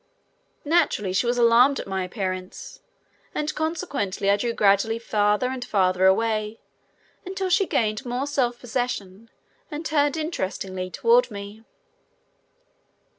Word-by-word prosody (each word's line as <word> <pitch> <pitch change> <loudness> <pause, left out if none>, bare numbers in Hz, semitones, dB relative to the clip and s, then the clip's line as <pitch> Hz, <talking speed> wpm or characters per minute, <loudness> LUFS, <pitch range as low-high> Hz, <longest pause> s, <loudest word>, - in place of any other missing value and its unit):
Naturally 290 - +1
she 220 +6 +1
was 245 +1 +1
alarmed 240 +4 +5
at - - -5
my 190 -1 -2
appearance, 185 -1 -5 0.5
and 300 0 -1
consequently 290 - -1
I 200 - +3
drew 235 +3 -1
gradually 210 +1 +2
farther 210 +1 +1
and 260 -1 -4
farther 185 -4 +2
away 215 +2 +1 0.6
until 380 0 -3
she 385 +1 +3
gained 215 0 0
more 250 +1 -2
self 260 -5 0
possession 230 -4 -4 0.4
and 305 +2 -6
turned 290 -1 +1
interestingly 190 - -3
toward 470 - +3
me. 205 +1 -9
230 Hz, 125 wpm, -24 LUFS, 200-285 Hz, 0.6 s, alarmed